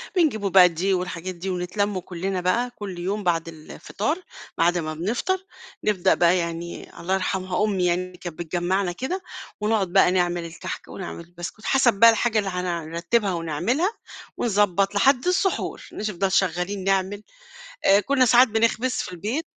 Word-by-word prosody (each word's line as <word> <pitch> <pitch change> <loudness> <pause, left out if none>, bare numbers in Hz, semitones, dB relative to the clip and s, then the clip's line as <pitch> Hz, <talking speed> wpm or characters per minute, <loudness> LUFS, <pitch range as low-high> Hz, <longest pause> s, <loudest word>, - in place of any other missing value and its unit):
بنجيب 305 - +2
بقى 190 -2 +6
دقيق 185 +3 0
والحاجات 180 0 -5
دي، 185 +3 -5
ونتلم 185 +2 -1
كُلنّا 185 +1 -4
بقى 235 +8 +1
كُلّ 200 -6 -7
يوم 195 +4 -2
بعد 170 -2 0
الفطار، 195 - -4 0.4
بعد 175 +1 +3
ما 155 -2 -3
بنفطر، 245 - -2 0.4
نبدأ 190 -3 +3
بقى 175 +1 +3
يعني 170 0 -5
الله 185 +3 -2
يرحمها 185 +1 -1
أمي 195 -4 +1
يعني 175 +1 +1
اللي 180 -1 -15
كانت 175 -2 -8
بتجمعنا 175 +3 -1
كده، 265 - -4 0.4
ونقعد 210 -2 +1
بقى - - +5
نعمل 175 -2 0
الكحك 165 +1 -7
ونعمل 175 -2 -7
البسكوت، 175 +5 -9
حسب 260 -3 +4
بقى 230 +4 +7
الحاجة 225 0 +2
اللي 200 -2 -2
هن 175 -3 -3
نرتبها 190 +4 0
ونعملها، 175 - 0 0.4
ونضبط 200 -3 +1
لحد 255 - +3
السحور، 365 +1 0
نش 215 - -3
نفضل 195 -1 -1
شغالين 190 +1 0
نعمل، 195 +1 0 0.6
آآ 195 +1 +6
كنّا 260 +4 +2
ساعات 245 +2 +6
بنخبز 225 +3 +1
في 215 - -3
البيت. 215 - -3
190 Hz, 160 wpm, -24 LUFS, 175-215 Hz, 0.6 s, بقى